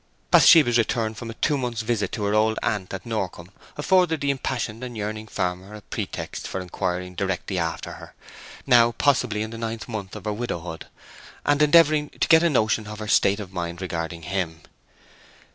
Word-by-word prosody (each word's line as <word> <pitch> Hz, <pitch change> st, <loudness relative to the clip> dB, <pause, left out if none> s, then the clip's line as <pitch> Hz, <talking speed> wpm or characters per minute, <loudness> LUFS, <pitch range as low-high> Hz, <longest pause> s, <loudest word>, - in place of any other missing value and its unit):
Bathsheba's 120 Hz, -8 st, +7 dB
return 110 Hz, -1 st, 0 dB
from 115 Hz, +2 st, -8 dB
a 115 Hz, -, -7 dB
two 145 Hz, +4 st, +1 dB
months' 120 Hz, -3 st, -3 dB
visit 110 Hz, -4 st, -1 dB
to 105 Hz, -, -3 dB
her 100 Hz, 0 st, 0 dB
old 110 Hz, +1 st, +2 dB
aunt 100 Hz, -4 st, -1 dB
at 95 Hz, -1 st, -6 dB
Norcombe 95 Hz, -5 st, -4 dB, 0.3 s
afforded 175 Hz, 0 st, +3 dB
the 140 Hz, 0 st, +1 dB
impassioned 125 Hz, -4 st, -3 dB
and 120 Hz, -2 st, -6 dB
yearning 110 Hz, +1 st, -4 dB
farmer 90 Hz, +2 st, -3 dB
a 105 Hz, -, -10 dB
pretext -, -, -5 dB
for -, -, -4 dB
inquiring 90 Hz, 0 st, -3 dB
directly 95 Hz, 0 st, -2 dB
after 80 Hz, -1 st, -3 dB
her—now 120 Hz, -3 st, 0 dB
possibly 120 Hz, -4 st, +1 dB
in 110 Hz, -, -6 dB
the 115 Hz, -, -7 dB
ninth 115 Hz, -1 st, -4 dB
month 110 Hz, -5 st, -6 dB
of 105 Hz, -1 st, -9 dB
her 105 Hz, -, -1 dB
widowhood—and 105 Hz, -, -4 dB
endeavouring 150 Hz, -1 st, +5 dB
to -, -, +2 dB
get 160 Hz, -1 st, +7 dB
a 170 Hz, -, +3 dB
notion 110 Hz, -5 st, +1 dB
of 105 Hz, 0 st, -7 dB
her 110 Hz, 0 st, -6 dB
state 100 Hz, 0 st, +3 dB
of 95 Hz, -3 st, -8 dB
mind 85 Hz, -1 st, -4 dB
regarding 85 Hz, -2 st, -4 dB
him. 85 Hz, -3 st, -3 dB
110 Hz, 180 wpm, -24 LUFS, 95-120 Hz, 0.3 s, Bathsheba's